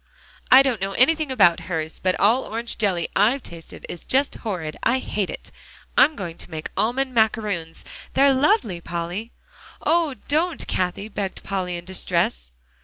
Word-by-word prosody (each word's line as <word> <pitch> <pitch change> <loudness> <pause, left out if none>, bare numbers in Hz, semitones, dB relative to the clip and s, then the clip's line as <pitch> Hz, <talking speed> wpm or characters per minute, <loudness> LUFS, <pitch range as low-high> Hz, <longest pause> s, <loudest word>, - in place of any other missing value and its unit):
"I 260 +2 +9
don't 250 -7 -1
know 195 0 -2
anything 305 +5 +3
about 175 -10 +5
hers, 160 -2 -3
but 185 -1 0
all 230 +6 +4
orange 230 +1 -4
jelly 185 -6 +1
I 210 +5 +5
have 275 - -6
tasted 165 -1 -11
is 170 - -7
just 275 +2 +1
horrid. 175 -9 -4
I 255 - +2
hate 210 -6 -2
it! - - -8 0.4
I'm 310 - +5
going 175 -6 -6
to - - -10
make 160 -2 -6
almond 260 +4 0
macaroons. 210 -8 0 0.3
They're 275 0 +5
lovely, 265 - +2
Polly." 175 +7 -4 0.5
"Oh! 330 -5 +2
don't, 325 +4 0
Cathie," 185 +3 -2
begged 200 -3 -5
Polly 185 -2 -2
in 170 - -9
distress. 60 - -1
205 Hz, 165 wpm, -23 LUFS, 175-260 Hz, 0.5 s, I